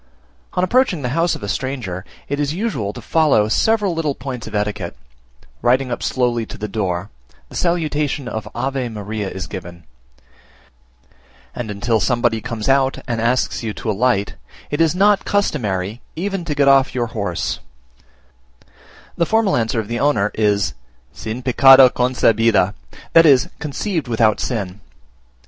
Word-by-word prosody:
On 180 - 0
approaching 185 - +2
the 125 - -1
house 165 +2 +1
of - - -9
a - - -3
stranger, 115 -8 -3 0.2
it 140 +1 -2
is 145 +1 -1
usual 170 - -2
to 120 +1 -10
follow 150 -10 +3
several 210 - +2
little 155 -4 -1
points 125 -3 -6
of - - -7
etiquette: 105 -5 -2 0.6
riding 125 +1 +2
up 120 - -3
slowly 120 -2 0
to - - -9
the 105 - -4
door, 95 -2 -3 0.4
the - - -12
salutation 150 -5 -1
of 110 -3 -5
Ave 130 -2 -2
Maria 105 -1 -4
is 95 0 -6
given, 85 -3 -9 1.7
and 120 -3 -5
until 110 +3 0
somebody 120 +2 +1
comes 110 -1 -4
out 135 0 +3
and 115 -2 -2
asks 120 +2 0
you 110 -3 -4
to 110 - -2
alight, 105 -1 +1 0.4
it 145 - 0
is 165 +1 +3
not 200 +2 +4
customary 110 - -1
even 190 +1 -3
to 150 - -2
get 140 -1 +3
off 135 -2 +4
your 120 -2 0
horse: 100 -6 -2 1.6
the 170 - +1
formal 220 -3 +2
answer 115 -1 0
of 110 - -4
the 120 +1 -3
owner 110 -8 +2
is, 100 -5 +1 0.4
"sin 115 +3 -6
pecado 135 +1 +7
concebida" 115 -5 +2 0.4
that 165 0 +7
is, 135 -4 +5
conceived 160 +1 -3
without 115 -2 +2
sin. 100 -6 -3
125 Hz, 155 wpm, -19 LUFS, 105-145 Hz, 1.7 s, pecado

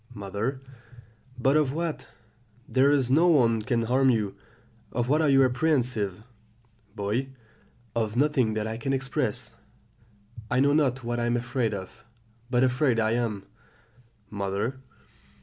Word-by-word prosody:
"Mother. 105 +6 -3 0.8
But 135 +3 +2
of 145 -3 +1
what? 165 0 -3 0.6
there 135 +2 +3
is 135 -4 +2
no 165 +6 +5
one 120 -9 +4
can 115 +1 0
harm 130 +3 +3
you; 105 -5 0 0.6
of 120 +1 -2
what 150 +3 +3
are 155 - +3
you 135 -1 +5
apprehensive? 125 - 0 0.7
"Boy. 110 +6 -2 0.7
Of 110 -2 -1
nothing 130 -5 +2
that 110 0 -1
I 110 0 -4
can 135 +4 -2
express; 135 0 -2 1.0
I 125 - +1
know 140 +1 +4
not 135 -4 +1
what 120 0 -2
I 120 - 0
am 120 0 +1
afraid 120 -2 -1
of, 95 -1 -9 0.5
but 125 0 +2
afraid 130 -1 +2
I 110 0 +1
am. 115 -4 -1 0.9
"Mother. 100 +5 -3
125 Hz, 140 wpm, -26 LUFS, 110-135 Hz, 1.0 s, no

